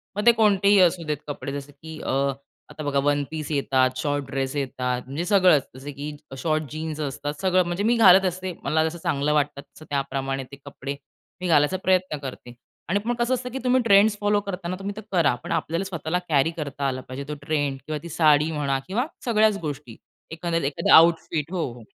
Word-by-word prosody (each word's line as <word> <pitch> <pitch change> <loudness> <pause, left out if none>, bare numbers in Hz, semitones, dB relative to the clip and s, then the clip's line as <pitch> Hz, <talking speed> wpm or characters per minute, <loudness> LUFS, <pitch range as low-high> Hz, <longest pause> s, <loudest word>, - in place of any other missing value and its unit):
मग 210 +2 -2
ते 235 - +9
कोणतेही 205 -3 +4
असू 175 -1 +3
देत 150 -2 -1
कपडे 145 -1 -5
जसं, 145 +1 -13
की 155 +2 -11
अ, - - -5 0.6
आता 155 - -7
बघा 140 -1 0
वन 145 0 +2
पीस 155 -1 -5
येतात, 130 -2 +2
शॉर्ट 145 0 -1
ड्रेस 135 +1 -3
येतात 125 -2 -2
म्हणजे 140 +6 -4
सगळंच 180 -8 +5
जसं 140 +2 -8
की 145 +2 -6 0.2
शॉर्ट 155 +2 0
जीन्स 155 0 -5
असतात 145 +1 -3
सगळं, 185 -1 +3
म्हणजे 175 +4 -2
मी 235 +2 +3
घालत 190 -3 +7
असते 185 0 -3
मला 160 +1 +2
जसं 170 - -9
चांगलं 145 +2 0
वाटतं 145 -1 0
तसं 155 - -17
त्याप्रमाणे, 135 -1 -2
ते 140 +2 -12
कपडे 140 0 -6 0.5
मी 180 - -2
घालायचा 150 +3 +3
प्रयत्न 185 -4 +1
करते. 130 -3 -8 0.4
आणि 200 +3 +2
मग 240 0 0
कसं 240 +2 0
असतं 250 0 -2
की 265 - -4
तुम्ही 255 0 +3
ट्रेंड्स 205 0 +5
फॉलो 205 0 +2
करताना 185 -2 -4
तुम्ही 200 +1 -5
ते 215 - -7
करा. 165 -8 +3
पण - - -6
आपल्याला 165 +4 -1
स्वतःला 170 -1 -2
कॅरी 150 +2 +3
करता 145 -4 -4
आला 130 -1 -2
पाहिजे 130 +2 -7
तो 150 - -4
ट्रेंड 145 -3 0
किंवा 155 -1 -3
ती 170 - -7
साडी 155 0 +3
म्हणा 140 -3 -1
किंवा 235 +8 0 0.2
सगळ्याच 215 -3 +3
गोष्टी. 145 -6 -6 0.3
एखाद्याला 165 -3 -1
एखादा 140 - +4
आउटफिट 165 -1 +4
हो, 175 -3 -1
हो. 120 -2 -13
155 Hz, 200 wpm, -24 LUFS, 140-185 Hz, 0.6 s, ते